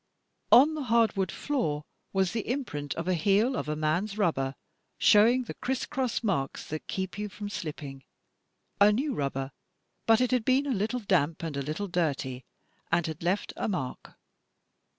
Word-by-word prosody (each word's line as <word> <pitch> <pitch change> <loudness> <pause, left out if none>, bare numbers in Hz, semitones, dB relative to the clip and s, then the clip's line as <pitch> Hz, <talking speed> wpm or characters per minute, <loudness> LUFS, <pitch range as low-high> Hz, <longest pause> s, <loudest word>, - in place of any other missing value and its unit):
On 285 +6 +8
the 300 -3 -4
hardwood 225 -5 +2
floor 155 - -1 0.3
was 190 -2 +1
the 225 -3 -3
imprint 195 - -3
of 165 - -3
the 185 - +1
heel 205 +9 +2
of 150 - -3
a 150 - 0
man's 170 +7 -1
rubber, 140 -9 0 0.4
showing 235 +5 +5
the - - -7
criss 265 0 -2
cross 255 -3 -2
marks 165 -11 -1
that 155 0 -5
keep 190 +1 -4
you 210 0 -3
from 205 +1 -7
slipping 145 -7 -6 0.4
— - - -42
a 205 +1 +8
new 270 +7 0
rubber, 135 - -2 0.6
but 225 0 +6
it 250 0 +1
had 250 -3 +2
been 260 +4 +3
a 275 - 0
little 225 +4 -1
damp 165 -6 +1
and 160 -3 -3
a 140 - -1
little 155 +9 -3
dirty, 140 -7 -1 0.5
and 170 0 +2
had 160 -1 -5
left 180 +4 -1
a - - -2
mark." 140 -11 -4
195 Hz, 175 wpm, -28 LUFS, 155-230 Hz, 0.6 s, On